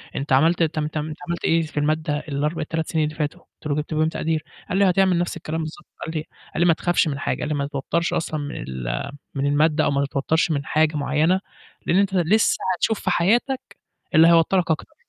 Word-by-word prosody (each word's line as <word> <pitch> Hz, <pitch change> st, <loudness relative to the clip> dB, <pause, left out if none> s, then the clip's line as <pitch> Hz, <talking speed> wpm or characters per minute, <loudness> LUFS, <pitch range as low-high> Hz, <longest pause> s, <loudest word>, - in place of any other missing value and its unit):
أنت 140 Hz, 0 st, -1 dB
عملت 165 Hz, +6 st, +4 dB
تم 155 Hz, -1 st, -1 dB
تم 155 Hz, 0 st, -3 dB
أنت 155 Hz, 0 st, -7 dB
عملت 170 Hz, 0 st, -2 dB
إيه 165 Hz, 0 st, +3 dB
في 155 Hz, -2 st, -7 dB
المادة 155 Hz, 0 st, 0 dB
ال4 150 Hz, +3 st, -1 dB
ال3 160 Hz, +1 st, -2 dB
سنين 160 Hz, -3 st, +1 dB
اللي 155 Hz, 0 st, -5 dB
فاتوا؟" 150 Hz, -1 st, -3 dB
قُلت 155 Hz, -, -12 dB
له. 145 Hz, -, 0 dB
"جبت 150 Hz, +2 st, -3 dB
فيهم 155 Hz, +1 st, +2 dB
تقدير." 160 Hz, -1 st, -2 dB, 0.3 s
قال 185 Hz, -, 0 dB
لي: 195 Hz, -1 st, +5 dB
"هتعمل 185 Hz, -1 st, +3 dB
نفس 175 Hz, -1 st, -1 dB
الكلام 160 Hz, 0 st, -4 dB
بالضبط" 160 Hz, +1 st, -7 dB, 0.2 s
قال 160 Hz, -, -5 dB
لي 155 Hz, -, -2 dB, 0.3 s
قال -, -, -3 dB
لي: 175 Hz, -, +5 dB
"ما 170 Hz, -, +6 dB
تخافش 175 Hz, +1 st, +1 dB
من 140 Hz, -2 st, -2 dB
حاجة" 125 Hz, -, -2 dB
قال -, -, -2 dB
لي: 150 Hz, -, 0 dB
"ما 140 Hz, -1 st, -1 dB
تتوترش 150 Hz, +4 st, -1 dB
أصلًا 155 Hz, -1 st, -2 dB
من 145 Hz, 0 st, -5 dB
ال 60 Hz, -, -4 dB, 0.2 s
من 140 Hz, 0 st, 0 dB
المادة، 150 Hz, +2 st, +3 dB
أو -, -, +2 dB
ما 140 Hz, 0 st, +1 dB
تتوترش 145 Hz, +4 st, 0 dB
من 140 Hz, -2 st, -1 dB
حاجة 155 Hz, 0 st, +2 dB
معينة 155 Hz, +6 st, +2 dB, 0.5 s
لإن 175 Hz, -, +2 dB
أنت 200 Hz, 0 st, +2 dB
لسه 190 Hz, +4 st, +3 dB, 0.2 s
هتشوف 220 Hz, +4 st, 0 dB
في -, -, -2 dB
حياتك 240 Hz, +9 st, +2 dB, 0.5 s
اللي 160 Hz, +1 st, +7 dB
هيوتّرك 170 Hz, +1 st, +4 dB
أكتر، 155 Hz, -, -2 dB
155 Hz, 225 wpm, -23 LUFS, 150-170 Hz, 0.5 s, اللي